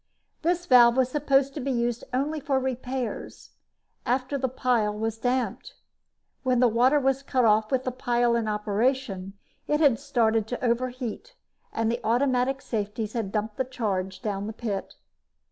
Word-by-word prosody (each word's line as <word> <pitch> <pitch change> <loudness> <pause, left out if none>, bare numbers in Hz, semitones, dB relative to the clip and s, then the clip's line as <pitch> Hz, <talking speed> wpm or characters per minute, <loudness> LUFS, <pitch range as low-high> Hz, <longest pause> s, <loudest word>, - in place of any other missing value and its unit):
This 350 +1 0
valve 240 -1 +6
was 260 -1 +3
supposed 275 -1 +2
to 300 - -5
be 275 0 -3
used 240 -1 -1
only 285 +5 -1
for 275 -1 0
repairs, 255 -1 -4 0.5
after 255 +3 -1
the 260 -2 0
pile 240 -4 +1
was 225 +1 -3
damped. 250 +1 -2 0.7
When 255 -2 +1
the 250 - +5
water 250 +6 +4
was 270 0 +1
cut 260 -3 +1
off 215 0 +3
with 260 -1 +1
the 255 - -2
pile 240 -1 +1
in 230 -2 0
operation, 210 -1 -1 0.3
it 295 - +1
had 280 -7 +4
started 225 -3 +1
to 245 +2 -3
overheat 250 - -2 0.4
and 225 0 0
the 235 - -3
automatic 255 +2 +1
safeties 210 0 -3
had 220 -5 -2
dumped 215 0 -2
the 260 - +1
charge 200 -6 -3
down 205 -2 -2
the 220 - -5
pit. 215 -4 -4
245 Hz, 160 wpm, -26 LUFS, 220-260 Hz, 0.7 s, valve